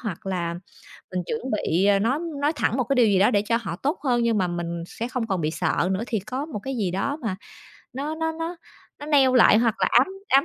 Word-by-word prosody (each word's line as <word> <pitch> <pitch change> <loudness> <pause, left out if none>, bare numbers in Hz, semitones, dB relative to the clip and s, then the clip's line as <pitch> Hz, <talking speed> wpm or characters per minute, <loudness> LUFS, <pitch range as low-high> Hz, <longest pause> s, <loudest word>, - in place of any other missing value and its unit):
hoặc 195 -6 -6
là 175 -3 -2 0.6
mình 180 -1 -1
chuẩn 230 - -3
bị, 195 -3 +1
ờ, 200 -1 +4
nói 250 +8 +1 0.2
nói 295 +2 +2
thẳng 245 - 0
một 255 - +2
cái 275 - 0
điều 245 -2 +5
gì 195 -2 +3
đó 210 +5 +4
để 205 - +3
cho 230 +3 +1
họ 170 -6 -4
tốt 285 - -2
hơn, 245 -4 +2
nhưng 230 -2 +2
mà 185 -2 +1
mình 170 -1 -4
sẽ 235 - -5
không 250 -2 -3
còn 190 -5 -1
bị 155 0 0
sợ 175 - 0
nữa 190 +3 -1
thì 220 -4 -1
có 255 +9 -4
một 295 -10 -6
cái 270 +4 -5
gì 195 -5 -1
đó 280 - -2
mà 210 -5 -2 0.6
nó 285 +4 -3
nó 320 0 -2
nó 330 +2 -5 0.4
nó 290 - -8
neo 270 -4 +4
lại 225 -2 +7
hoặc 230 -2 +2
là - - +2
ám 245 +3 +5 0.2
ám 275 +3 +5
230 Hz, 260 wpm, -24 LUFS, 190-270 Hz, 0.6 s, lại